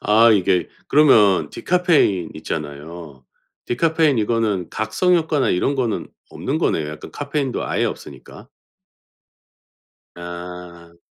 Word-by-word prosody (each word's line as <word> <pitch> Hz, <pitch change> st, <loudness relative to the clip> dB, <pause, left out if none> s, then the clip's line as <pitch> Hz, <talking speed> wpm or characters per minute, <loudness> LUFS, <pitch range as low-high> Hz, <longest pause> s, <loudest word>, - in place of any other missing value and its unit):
아 110 Hz, +3 st, +5 dB
이게 95 Hz, -2 st, +1 dB, 0.2 s
그러면 110 Hz, -10 st, +5 dB
디카페인 160 Hz, -, +1 dB
있잖아요. 75 Hz, -2 st, -7 dB, 0.4 s
디카페인 155 Hz, 0 st, +2 dB
이거는 105 Hz, -5 st, 0 dB
각성 180 Hz, +11 st, +1 dB
효과나 155 Hz, -4 st, 0 dB
이런 130 Hz, +10 st, +1 dB
거는 120 Hz, -5 st, -2 dB, 0.2 s
없는 -, -, -3 dB
거네요, 75 Hz, -2 st, 0 dB
약간 75 Hz, 0 st, -9 dB
카페인도 140 Hz, -2 st, -3 dB
아예 -, -, 0 dB
없으니까. -, -, -8 dB, 1.7 s
아. 85 Hz, -1 st, -9 dB
105 Hz, 260 characters per minute, -20 LUFS, 85-140 Hz, 1.7 s, 아